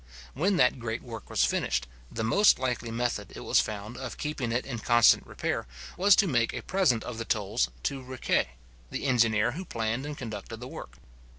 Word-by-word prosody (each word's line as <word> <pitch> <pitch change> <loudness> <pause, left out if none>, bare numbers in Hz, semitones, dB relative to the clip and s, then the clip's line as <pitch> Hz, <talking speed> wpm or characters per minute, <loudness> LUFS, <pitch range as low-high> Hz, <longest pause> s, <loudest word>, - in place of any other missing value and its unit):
When 185 +9 +1
that 125 -3 +3
great 115 -1 -4
work 115 -4 -9
was - - +3
finished, - - 0 0.2
the 110 - -3
most 200 - +5
likely 125 -2 -2
method, 120 +1 -2
it - - -7
was - - +3
found, 105 +2 -3
of 130 -2 -6
keeping 145 -6 -3
it 120 +2 0
in 120 -4 -4
constant 120 +1 +5
repair, - - -3 0.3
was 195 +1 +6
to 200 - +3
make 120 -7 +1
a - - -5
present 180 -12 +2
of 115 -2 -6
the 115 - -3
tolls 100 - 0
to 135 - -2
Riquet, 130 0 0 0.4
the - - -4
engineer 115 -3 +3
who 170 +9 -5
planned 115 -2 -2
and 150 -1 -6
conducted 110 -5 -6
the - - -7
work. - - -9
120 Hz, 195 wpm, -28 LUFS, 115-135 Hz, 0.4 s, was